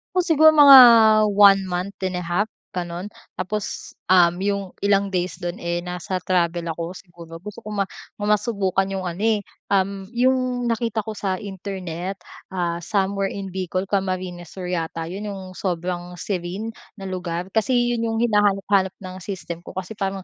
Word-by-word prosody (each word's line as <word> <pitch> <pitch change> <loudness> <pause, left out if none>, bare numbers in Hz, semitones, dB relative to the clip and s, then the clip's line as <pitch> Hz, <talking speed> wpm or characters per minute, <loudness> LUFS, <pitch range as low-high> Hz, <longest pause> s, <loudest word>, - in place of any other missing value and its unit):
O - - +4
siguro 315 -3 +6
mga 290 -3 +10 0.5
1 200 -1 +6
month 185 +1 -4
and 185 -1 -1
a - - -5
half 180 +5 -1 0.2
gano'n. 175 +1 -4 0.3
Tapos, 200 +3 -4 0.2
um, 180 -2 +6
'yong 200 +1 0 0.2
ilang 200 0 +2
days 180 -1 -1
do'n 175 0 -4
eh, 170 0 -2
nasa 180 +1 -4
travel 170 -2 0
ako 170 +2 -5
siguro. 170 -3 -12
Gusto 210 +4 -9
ko 215 - -14
ma 200 -1 0 0.3
masubukan 205 -2 0
'yong 195 -1 -4
ano 180 +3 -4
eh, 220 -2 +3 0.3
um, 195 0 0
'yong 250 +1 +1
nakita 230 -1 -1
ko 220 - -5
sa 195 -3 -2
internet, 190 -2 -5 0.3
ah, 175 -2 -2
somewhere 195 +2 0
in 195 -1 -6
Bicol, 185 0 -2
Camarines 185 -3 -3
Sur 180 -2 -5
yata 165 -1 -3
'yon 190 +6 -6
'yong 195 -2 -6
sobrang 180 -1 -4
serene 185 +4 -4 0.2
na 195 - -10
lugar. 180 -1 -4
Kasi 225 +5 +1 0.2
'yon 230 -1 -1
'yong 225 +1 0
hinahanap-hanap 200 -3 +2
ng 185 0 -7
system 175 -3 -6
ko - - -11
kasi 190 +2 -5
parang 195 -2 -3
190 Hz, 165 wpm, -22 LUFS, 180-205 Hz, 0.5 s, mga